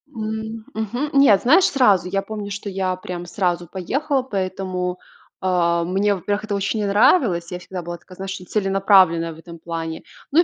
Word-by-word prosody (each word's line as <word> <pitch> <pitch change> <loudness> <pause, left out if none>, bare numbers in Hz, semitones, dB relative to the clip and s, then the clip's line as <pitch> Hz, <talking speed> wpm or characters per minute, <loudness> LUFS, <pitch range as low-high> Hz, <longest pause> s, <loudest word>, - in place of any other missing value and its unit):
М, 220 0 -5
мгм, 240 +7 -2
нет, 210 -9 +6
знаешь, 325 +10 +5
сразу 205 -10 +3
я 195 +2 0
помню, 205 0 -6
что 205 +1 -5
я 190 -1 -1
прям 180 -1 -7
сразу 175 -2 -1
поехала. 270 - -1
Поэтому, 185 -4 -3 0.4
а, 170 -2 +2
мне, 195 +3 +1
во-первых, 205 +4 -2
это 205 -2 -2
очень 200 +3 -1
не 210 - 0
нравилось. 200 - +3
Я 180 - -4
всегда 180 0 -7
была 175 +1 -6
такая, 185 +1 -16
знаешь, 195 +1 -5
целенаправленная 190 -4 +3
в - - -15
этом 170 0 -12
плане. 165 -1 -5 0.3
Ну, 315 - +4
и, - - +7
195 Hz, 180 wpm, -21 LUFS, 180-215 Hz, 0.4 s, и